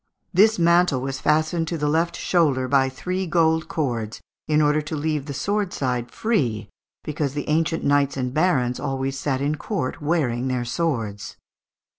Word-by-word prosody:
This 215 +5 +5
mantle 170 -4 +4
was 135 0 -3
fastened 155 +2 +1
to 170 - -2
the 150 -1 -1
left 165 +3 +1
shoulder 145 -8 +1
by 135 -1 +3
three 185 +8 -3
gold 160 -1 +2
cords, 115 -8 -2 0.3
in 150 0 +3
order 150 0 +3
to 150 +1 -5
leave 150 -1 -2
the 140 - -4
sword 200 +6 -1
side 125 -3 -2
free, 120 - -1 0.3
because 150 -2 -3
the 145 - -3
ancient 160 +1 +1
knights 140 -1 +2
and 125 -1 -2
barons 135 -7 +1
always 135 -1 -2
sat 135 -2 -1
in 150 +2 0
court 155 -5 -3
wearing 140 -6 0
their 125 -2 -1
swords. 115 -8 -3
145 Hz, 165 wpm, -23 LUFS, 130-165 Hz, 0.3 s, This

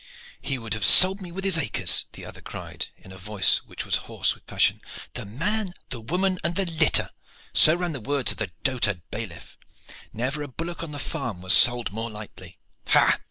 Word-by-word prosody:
"He 135 - -3
would 115 -3 -6
have 110 -2 -3
sold 190 - +8
me 180 -2 -9
with 190 +2 -5
his 190 -4 +4
acres," 135 - +3
the - - -10
other - - -11
cried, - - -7
in 95 - -16
a 95 - -12
voice 100 +1 +1
which - - -9
was - - +1
hoarse - - 0
with - - -21
passion. - - +1 0.3
"'The - - -6
man, 185 - -1 0.2
the 120 -3 -6
woman 180 +9 -1
and 170 0 -1
their 195 - +1
litter' 165 -3 +2 0.4
so 155 - +6
ran 175 -1 -3
the 140 -5 -6
words 140 +2 0
of - - -5
the 110 -4 -2
dotard 110 -9 0
bailiff. 105 -7 -7 0.5
Never 130 +6 -3
a 145 - -5
bullock 165 +5 -6
on 165 -2 -6
the 145 - -7
farm 125 - -5
was 90 - +5
sold 120 -3 +5
more 115 +3 -5
lightly. 105 -1 -11 0.3
Ha! - - +4
135 Hz, 205 wpm, -24 LUFS, 110-170 Hz, 0.5 s, sold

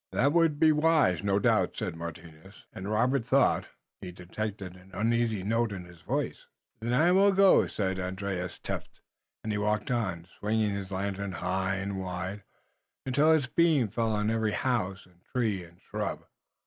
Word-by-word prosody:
"That 140 +3 +2
would 165 -3 +3
be 160 -1 +6
wise, 150 - +3
no 100 -1 +2
doubt," 100 - +2
said - - -3
Martinus, 85 +2 -10
and 95 +2 -6
Robert 120 +4 +2
thought 130 +3 +2 0.3
he 90 - -6
detected 95 +1 -6
an 90 +1 -17
uneasy 115 -2 +1
note 115 +2 +1
in 95 -3 -6
his 90 -2 -15
voice. - - -3 0.3
"Then 115 +2 -3
I 155 +8 +4
will 195 +2 +5
go," 195 0 +5
said 95 -2 -2
Andrius 95 0 -3
Tefft, - - -6 0.4
and 110 - -2
he 105 - -1
walked 105 +2 0
on, 95 -9 -1
swinging 105 0 +1
his 100 -1 -4
lantern 100 0 -3
high 95 +2 -1
and 95 0 -3
wide, 95 +2 -4 0.6
until 140 +4 +3
its 155 -4 +3
beams 135 - +2
fell 115 -1 0
on 105 +1 0
every 110 -2 0
house 100 -7 -1
and 90 -1 -25
tree 110 -7 0
and 85 +1 -17
shrub. - - -4
105 Hz, 170 wpm, -29 LUFS, 95-120 Hz, 0.6 s, be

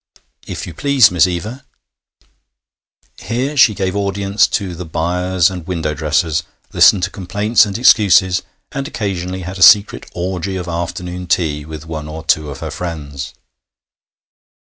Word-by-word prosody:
'If - - -5
you 85 - -8
please, 135 - +4
Miss 90 0 +4
Eva 105 +9 -5 1.0
'. - - -44
Here 130 +6 -2
she 125 -6 +5
gave 95 -1 -2
audience 100 0 +1
to 95 -3 -3
the 90 +2 -7
'buyers' 90 +2 0
and 90 -3 -8
window 80 -4 -2
dressers, 75 +2 0 0.3
listened 95 - +5
to - - -1
complaints 105 +4 +1
and 100 - -4
excuses, 95 -6 +4 0.3
and 135 0 -4
occasionally 95 - -4
had 90 +2 -7
a - - -7
secret 100 +4 +5
orgy 95 +1 -3
of 90 -2 -5
afternoon 90 +1 -5
tea 75 -4 0
with 80 0 -9
one 80 -2 -6
or 80 +1 -8
two 80 -4 +1
of 70 -1 -8
her 80 -1 -5
friends. 75 -4 -6
90 Hz, 150 wpm, -17 LUFS, 80-100 Hz, 1.0 s, she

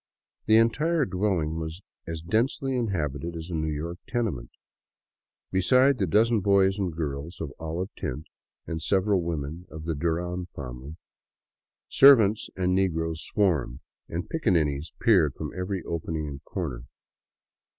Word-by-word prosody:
The 110 - +6
entire 150 +8 +3
dwelHng 90 -6 -1
was 80 +4 -6 0.2
as 80 -1 -5
densely 125 +7 0
inhabited 85 - -2
as 80 +2 -7
a - - -4
New 80 -1 -1
York 85 +4 -4
tenement. 110 - -2 1.0
Besides 125 +8 +4
the 95 - +1
dozen 110 +6 +3
boys 100 0 +3
and 95 -3 0
girls 80 +1 -5
of 70 -4 -5
olive 85 +4 -3
tint 75 +5 -4 0.4
and 80 -1 -4
several 95 +1 +2
women 85 +1 -4
of 80 0 -8
the 80 +1 -1
Duran 85 +3 -2
family, 65 +2 -7 0.9
servants 115 -7 +6
and 90 -1 +1
negroes 80 -4 0
swarmed, 75 -10 0 0.3
and 85 +2 -4
piccaninnies 80 - 0
peered - - +4
from - - -5
every 90 0 -3
opening 80 -2 -3
and 70 0 -8
corner. 65 -11 -4
85 Hz, 135 wpm, -27 LUFS, 80-100 Hz, 1.0 s, The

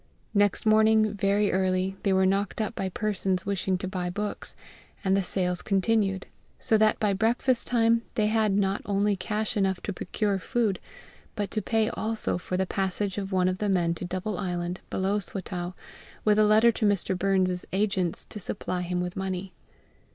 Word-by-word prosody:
Next 205 0 +2
morning, 215 0 +4
very 200 +1 +1
early, 185 0 0
they 200 - +1
were 190 0 +4
knocked 195 +2 0
up 215 -2 -1
by 190 - -2
persons 190 -2 -1
wishing 195 -1 0
to 185 - -4
buy 180 -1 -3
books, 205 +3 -4 0.5
and 190 0 +3
the 195 - +2
sales 180 -1 -1
continued; 195 -1 +1 0.3
so 220 - +1
that 215 0 +3
by 210 -2 +2
breakfast 235 +4 +1
time 230 -1 +3
they 215 -4 +2
had 215 -1 +2
not 195 0 +1
only 200 0 +2
cash 215 +4 -2
enough 190 -3 +1
to 205 - -4
procure 200 +2 -1
food, 220 -1 0 0.6
but 205 -1 -3
to 215 - -1
pay 220 +2 +1
also 220 -4 -2
for 180 0 -3
the 190 - +1
passage 195 +1 -1
of 195 0 -5
one 185 -1 +2
of 185 0 -1
the 210 - 0
men 175 -3 +2
to 170 - -7
Double 185 +2 -3
Island, 175 -1 -3
below 195 +2 0
Swatow, 180 -2 -5 0.5
with 210 0 +4
a 215 - +6
letter 215 +3 +5
to 220 - -1
Mr. 195 -2 +1
Burns's 185 -1 +1
agent 190 -3 0
to 210 - -7
supply 185 -2 -2
him 180 0 -2
with 180 0 -4
money. 190 -1 -4
195 Hz, 180 wpm, -27 LUFS, 185-215 Hz, 0.6 s, a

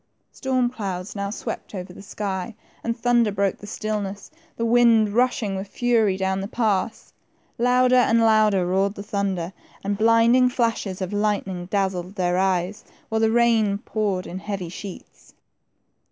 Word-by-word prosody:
Storm 255 -2 0
clouds 195 -5 -5
now 200 0 -2
swept 210 - -6
over 180 -1 -6
the - - -11
sky, 200 +1 -4 0.3
and 230 0 -2
thunder 240 -2 +2
broke 200 -1 0
the 205 - -10
stillness, 205 0 -4 0.3
the 230 - -1
wind 230 -2 +5
rushing 225 -3 +1
with 190 +1 -5
fury 225 -4 +1
down 190 0 -1
the 195 - -4
pass. 220 -1 -1 0.5
Louder 250 +1 +4
and 230 -2 +4
louder 215 -4 +4
roared 195 +3 +1
the 200 - -7
thunder, 195 -4 -2 0.3
and 200 +1 -2
blinding 230 +3 +5
flashes 225 -6 -1
of 185 - -5
lightning 200 -4 -1
dazzled 190 -1 -2
their 180 -2 +1
eyes, 190 +1 0 0.3
while 220 0 0
the 225 - +4
rain 225 -3 +3
poured 200 -3 -2
in 185 - -6
heavy 190 -3 -5
sheets. 185 +1 -10
205 Hz, 155 wpm, -23 LUFS, 190-230 Hz, 0.5 s, wind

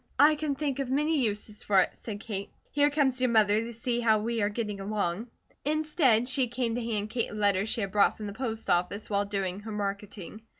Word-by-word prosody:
"I 295 +3 +7
can 300 -2 -2
think 280 -1 -2
of 270 -2 -2
many 300 +3 +2
uses 210 -3 -2
for 195 -2 +3
it," - - 0
said 210 -2 -7
Kate. 200 -4 -5 0.2
"Here 290 0 +3
comes 275 -4 +1
your 255 - +3
mother 215 -2 +4
to 230 +1 -5
see 235 +1 -2
how 225 -2 +4
we 225 +1 -1
are 205 - +2
getting 210 -2 -3
along." 200 +1 -2 0.4
Instead, 300 -6 +2
she 265 -1 +2
came 240 -1 -2
to 240 +1 -2
hand 215 -2 -2
Kate 235 -1 -1
a - - -8
letter 200 -1 +2
she 225 - -1
had 195 -2 -2
brought 205 0 +3
from 215 - -6
the 200 - -5
post 225 -1 -3
office 180 +5 0
while 200 0 +2
doing 195 -2 -2
her 220 +1 -8
marketing. 205 0 -5
220 Hz, 225 wpm, -28 LUFS, 205-255 Hz, 0.4 s, I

